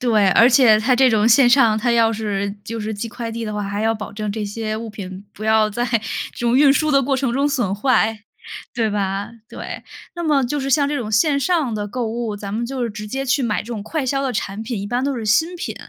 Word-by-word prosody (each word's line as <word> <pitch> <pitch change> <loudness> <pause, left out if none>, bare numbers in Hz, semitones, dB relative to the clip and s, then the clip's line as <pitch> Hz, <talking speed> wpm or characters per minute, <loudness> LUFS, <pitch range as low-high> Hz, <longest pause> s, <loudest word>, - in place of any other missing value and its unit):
对， 215 -5 +3
而 230 +6 +6
且 240 -4 +6
它 250 +4 +2
这 260 0 +5
种 215 -1 +2
线 240 +1 +6
上， 235 -4 +4
它 240 +2 0
要 225 -1 +3
是 200 -2 -3
就 230 0 -5
是 215 +1 -3
寄 225 +3 -5
快 230 0 -6
递 230 0 -4
的 210 -1 -4
话， 210 - -2
还 200 +1 -3
要 225 0 +1
保 210 - -7
证 210 0 -4
这 215 -1 -3
些 215 +1 -4
物 225 0 -6
品 195 -2 -8
不 215 - -9
要 220 -1 +3
在 240 +3 -2 0.5
这 - - -10
种 240 +2 +3
运 285 -1 +6
输 310 +1 +1
的 275 -1 +4
过 270 +1 0
程 260 -3 -1
中 280 +3 +1
损 220 -9 -1
坏， 225 -1 +1 0.6
对 225 -3 0
吧？ 200 0 -2 0.2
对。 - - -7 0.3
那 345 - -5
么 290 -5 +2
就 290 +4 -2
是 270 - -3
像 285 +1 +3
这 290 0 -1
种 215 -3 -5
线 280 +6 +2
上 305 -9 0
的 205 -1 -3
购 240 +2 -3
物， 225 -2 -3
咱 200 -1 -7
们 235 +1 -2
就 260 -1 -4
是 230 - -3
直 210 0 -7
接 270 +5 -3
去 265 +1 +1
买 215 -3 -1
这 - - -16
种 225 -4 -5
快 295 +5 -3
销 275 +2 0
的 265 - -1
产 210 0 -4
品， 225 -2 -4
一 200 - -5
般 245 +4 -1
都 275 -2 -1
是 225 - -5
新 325 - +2
品。 - - -5
230 Hz, 285 characters per minute, -20 LUFS, 210-265 Hz, 0.6 s, 而